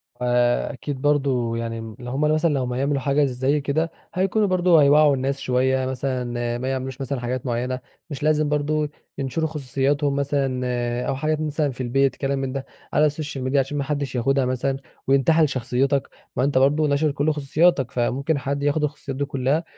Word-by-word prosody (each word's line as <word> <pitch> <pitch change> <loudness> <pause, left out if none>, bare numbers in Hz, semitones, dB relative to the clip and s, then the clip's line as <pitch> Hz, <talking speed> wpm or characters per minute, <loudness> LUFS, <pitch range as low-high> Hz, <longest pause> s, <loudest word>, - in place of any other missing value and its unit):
فأكيد 125 +3 0
برضو 135 -5 +1
يعني 115 -1 -3
م 110 -1 -8
لو 125 0 -6
هم 135 +3 -2
مثلًا 155 +2 +3
لمّا 125 -1 -2
هيعملوا 140 +2 0
حاجة 140 +2 +2
زي 135 +3 0
كده 160 +4 -1 0.2
هيكونوا 195 +3 +1
برضه 180 -3 +4
هيوعُّوا 145 0 +5
الناس 135 +1 -2
شوية 130 +1 +1
مثلًا 125 -2 -2
ما 125 +2 -4
يعملوش 130 0 -4
مثلًا 135 0 -2
حاجات 125 +1 -3
معينة، 125 +1 -2 0.3
مش 145 -2 -6
لازم 155 -1 +2
برضه 150 +1 0 0.3
ينشروا 140 +4 -1
خصوصياتهم 140 -1 0
مثلًا 140 -2 0 0.5
أو - - 0
حاجات 155 +3 -1
مثلًا 150 -1 0
في 130 - -7
البيت 135 +2 +2
كلام 135 0 -1
من 135 -1 -2
ده 135 -1 -4 0.3
على 150 0 +4
الsocial 150 -1 -5
media 130 - -1
عشان 140 +1 +1
ما 140 - 0
حدش 140 -2 -3
ياخدها 135 +2 +2
مثلًا 130 +2 -1 0.3
وينتحل 145 +4 +4
شخصيتك، 135 +2 0 0.3
ما 125 - +1
أنتَ 140 0 +1
برضه 145 +4 +3
ناشر 145 +1 +2
كل 145 +2 +1
خصوصياتك، 145 -1 +2
فممكن 135 +5 0
حد 140 +1 -2
ياخد 145 +1 +1
الخصوصيات 145 -2 -3
دي 140 - 0
كلها 140 +3 0
140 Hz, 180 wpm, -23 LUFS, 130-150 Hz, 0.5 s, هيوعُّوا